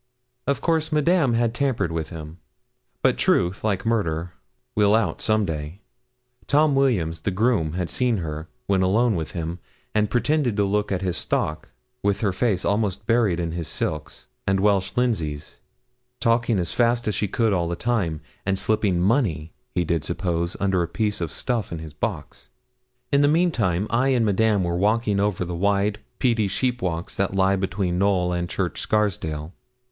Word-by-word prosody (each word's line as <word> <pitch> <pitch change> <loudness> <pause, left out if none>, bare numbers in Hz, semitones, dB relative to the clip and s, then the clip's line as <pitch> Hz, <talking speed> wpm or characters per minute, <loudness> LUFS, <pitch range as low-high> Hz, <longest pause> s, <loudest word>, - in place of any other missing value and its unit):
Of 140 - 0
course 160 -2 +1
Madame 150 -4 +3
had 115 -1 +1
tampered 130 -10 0
with 80 -1 -3
him. 80 0 -9 0.6
But - - +3
truth, 90 +3 +2
like 105 0 0
murder, 90 -7 0 0.4
will 105 0 +4
out 115 - 0
some 110 -1 +2
day. 80 +3 -5 0.7
Tom 150 +1 +4
Williams, 105 -13 +1
the 90 - -2
groom, 100 -5 +1
had 90 -1 -2
seen 125 +1 +1
her, 80 -2 -5 0.2
when 95 -1 +2
alone 110 +6 +3
with 80 -4 -3
him, 85 0 -4 0.3
and 105 -1 +2
pretending 130 -1 +1
to 100 - +2
look 105 +1 0
at 95 0 -1
his 90 -2 -1
stock, 75 0 -2 0.3
with 100 0 0
her 100 -4 +1
face 95 -2 0
almost 100 -1 0
buried 110 -6 +2
in 85 -1 -2
his 85 -1 -4
silks 75 -2 -3 0.2
and 95 0 +2
Welsh 100 -1 +2
linseys, 85 -13 -1 0.6
talking 115 -2 +2
as 85 -3 -2
fast 120 0 +2
as 105 - +1
she 105 +2 -1
could 110 +2 +1
all 85 -3 +1
the 85 - -2
time, 90 -8 -1 0.2
and 95 0 0
slipping 105 -4 +1
money, 90 - +1 0.2
he 90 - +2
did 80 -2 0
suppose, 85 0 -2
under 95 -2 +1
a 85 - 0
piece 105 +3 -1
of 85 -2 -2
stuff 120 -5 -2
in 85 - -3
his 80 -1 -8
box. 75 - -5 0.6
In 140 0 +4
the 145 - +5
mean 170 +4 +3
time, 95 - 0
I 125 +3 +2
and 125 -4 +3
Madame 105 -1 +2
were 85 -1 -1
walking 105 +1 +2
over 100 -3 0
the 90 - -5
wide, 100 +3 +1 0.2
peaty 115 -5 +2
sheep 125 +5 -1
walks 85 -1 -3
that 95 0 0
lie 95 0 +3
between 95 -2 -1
Knowl 95 -3 +2
and 85 0 -2
Church - - -2
Scarsdale. 95 -7 -1
100 Hz, 180 wpm, -24 LUFS, 85-115 Hz, 0.7 s, the